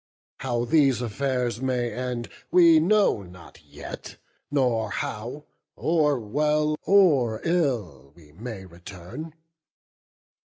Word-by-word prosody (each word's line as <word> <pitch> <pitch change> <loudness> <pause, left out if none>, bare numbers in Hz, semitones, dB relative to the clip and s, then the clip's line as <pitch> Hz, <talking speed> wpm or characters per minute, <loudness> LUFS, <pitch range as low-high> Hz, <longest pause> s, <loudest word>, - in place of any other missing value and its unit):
How 120 -2 -1
these 140 -3 +3
affairs 125 +1 -2
may 125 -3 -1
end, 125 0 -4 0.2
we 170 -3 +6
know 195 - +3
not 90 -2 -14
yet; - - -9 0.3
Nor 125 -6 +1
how, 125 +11 -5 0.3
or 150 -4 +1
well 150 +7 +1
or 145 - +4
ill, 115 - -1
we 75 -4 -18
may 105 +2 -8
return. 95 - -10
125 Hz, 105 wpm, -25 LUFS, 110-150 Hz, 0.3 s, we